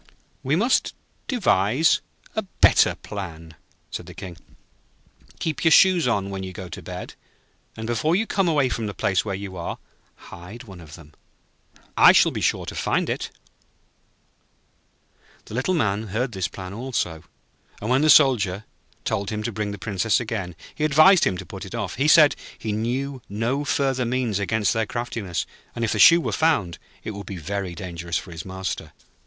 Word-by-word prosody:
'We 135 +3 +1
must 235 +9 +1 0.3
devise 155 - +2 0.3
a 220 - +1
better 195 - +3
plan,' 85 -6 -8 0.4
said - - -6
the - - -11
King. 90 -2 -8 1.0
'Keep 160 -2 -2
your 165 - +5
shoes 180 -3 +5
on 100 -4 0
when 95 -1 -4
you 95 -1 -6
go 95 - -7
to - - -8
bed, - - -7 0.6
and 110 - -5
before 120 +9 +1
you 220 +4 +1
come 195 -4 0
away 145 -5 +3
from 115 -3 -3
the 100 - -6
place 95 - +1
where 100 -3 -3
you 95 -1 -7
are 85 - -4
taken, - - -25
hide 105 +9 -10
one 95 -6 -12
of 80 -2 -11
them. 80 -3 -15 0.8
I - - +8
shall - - +5
be - - -4
sure - - 0
to - - -6
find - - 0
it.' - - -3 2.2
The - - -11
Little 130 +11 0
Man 110 - 0
heard 120 +6 -2
this 95 -5 -2
plan 95 +1 -8
also; 105 -9 -3 0.6
and 110 +4 -3
when 130 +2 +4
the 155 - +3
Soldier 110 -9 +5 0.4
told 100 0 -1
him 105 0 -3
to 120 - -2
bring 105 0 -3
the 100 - -5
Princess 100 +1 0
again, 105 -7 -4 0.2
he - - -4
advised 155 +5 +6
him 95 - 0
to 95 - -7
put - - -8
it - - -7
off. - - -4
He 140 +4 +2
said 155 -2 +7 0.2
he 110 - -4
knew 125 +5 -2
no 115 +8 -1
further 135 -3 0
means 120 -4 -1
against 100 -1 +1
their 110 -1 0
craftiness; 115 -7 -3 0.3
and 115 -1 -1
if 110 - -1
the - - -1
shoe 170 0 +8
were - - -2
found, 105 - +1 0.2
it - - -4
would 100 -1 -8
be 95 - -6
very 95 +1 -4
dangerous 85 -1 -4
for - - -7
his 80 -2 -7
master. 95 0 -5
110 Hz, 185 wpm, -23 LUFS, 95-135 Hz, 2.2 s, I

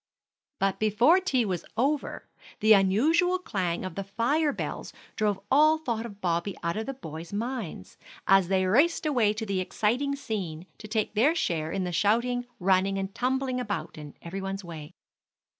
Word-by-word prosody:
But 195 0 0
before 235 - +4
tea 270 -11 +1
was 180 -4 -2
over, 280 +5 -1 0.3
the 220 0 +6
unusual 295 - +3
clang 185 - -2
of 185 - -5
the 195 - -4
fire 260 +10 +1
bells - - -5 0.2
drove 210 -2 0
all 310 +3 +5
thought 235 -7 -3
of 205 -3 -13
Bobby 175 +1 -1
out 170 0 -1
of 220 +3 -3
the 270 - -4
boys' 160 - -8
minds, 215 - -5 0.3
as 195 -2 +5
they 190 0 +2
raced 290 - +3
away 245 -9 +3
to 215 +1 -4
the 200 -2 -1
exciting 240 +9 0
scene, 185 - -5
to 215 - -9
take 215 -1 -1
their 260 +10 +3
share 160 - -1
in 195 - -1
the 180 - -3
shouting, 240 +7 +1
running, 190 +1 +2
and 195 0 -3
tumbling 260 +1 -1
about 200 -10 -4
in 150 -2 -10
every 190 +3 -5
one's 195 +1 -4
way. 160 -4 -9
210 Hz, 175 wpm, -27 LUFS, 185-255 Hz, 0.3 s, the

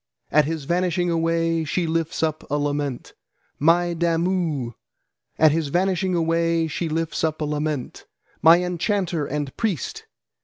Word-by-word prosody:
at 150 0 +5
his 160 -1 -3
vanishing 175 +2 0
away 165 0 +1
she 170 +3 -1
lifts 165 +1 -1
up 155 0 -1
a 145 - 0
lament; 145 -3 -2 0.5
'My 170 +3 +3
Damu!' 165 -6 0 0.6
at 155 -1 +6
his 160 0 0
vanishing 185 +3 +1
away 165 0 +1
she 160 +2 -3
lifts 160 0 -2
up 155 -1 0
a 155 - -1
lament. 150 -2 -3 0.3
'My 170 +2 +7
enchanter 180 -3 -1
and 145 -1 -3
priest!' 205 - -3
165 Hz, 140 wpm, -23 LUFS, 150-175 Hz, 0.6 s, My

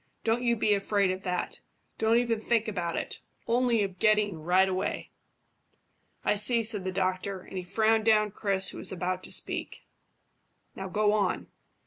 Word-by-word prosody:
"Don't 230 +2 +1
you 235 -1 +2
be 215 -1 +2
afraid 200 -1 +1
of 185 +1 -4
that. 180 -1 -3 0.4
Don't 225 +1 +3
even 235 -2 +1
think 225 0 0
about 175 -5 -2
it, - - -4 0.3
only 235 -2 +2
of 190 -2 -5
getting 210 -6 +2
right 180 +4 +3
away." 185 0 -3 1.1
"I - - +3
see," 225 +3 +3
said 210 -4 0
the 185 - -1
doctor, 185 0 -2
and 190 - -12
he 185 - -3
frowned 220 +4 +2
down 215 -2 +4
Chris, 195 -2 0
who - - -8
was - - +1
about 185 0 -2
to - - -10
speak. - - -1 0.9
"Now 190 - -5
go 210 +2 +2
on." 205 -3 -1
205 Hz, 170 wpm, -28 LUFS, 185-220 Hz, 1.1 s, down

